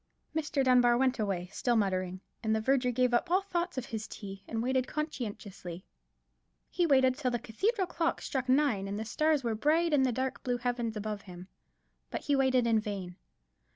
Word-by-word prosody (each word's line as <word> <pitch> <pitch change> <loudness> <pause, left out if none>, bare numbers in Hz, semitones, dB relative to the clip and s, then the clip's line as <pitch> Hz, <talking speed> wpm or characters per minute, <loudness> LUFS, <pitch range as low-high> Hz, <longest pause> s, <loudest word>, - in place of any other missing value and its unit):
Mr. 305 -3 0
Dunbar 245 -2 +5
went 260 -1 +2
away, 195 -4 -1
still 240 -1 +1
muttering, 185 -3 0 0.2
and 220 -1 +1
the - - +1
verger 250 +2 +2
gave 250 0 +2
up 285 +9 +2
all 375 +3 +3
thoughts 350 -4 -2
of 255 - -2
his 220 -1 -5
tea, 195 -1 -8
and 225 0 -2
waited 260 0 +1
conscientiously. 205 - -5 0.9
He 350 -2 +2
waited 260 -3 +4
till 260 -2 -1
the 240 - 0
cathedral 380 - 0
clock 335 -1 -1
struck 260 -2 -3
nine, 255 -8 +3
and 200 +1 -3
the 220 - -3
stars 305 +4 +1
were 230 -2 0
bright 310 +8 +2
in 285 - +5
the 260 -1 +3
dark 260 +2 -2
blue 245 -1 -1
heaven 240 -1 -1
above 210 -1 -4
him: 180 -1 -11 0.6
but - - -4
he 290 - +1
waited 260 -2 +3
in 225 -1 +3
vain. 195 -4 -5
245 Hz, 190 wpm, -31 LUFS, 215-275 Hz, 0.9 s, Dunbar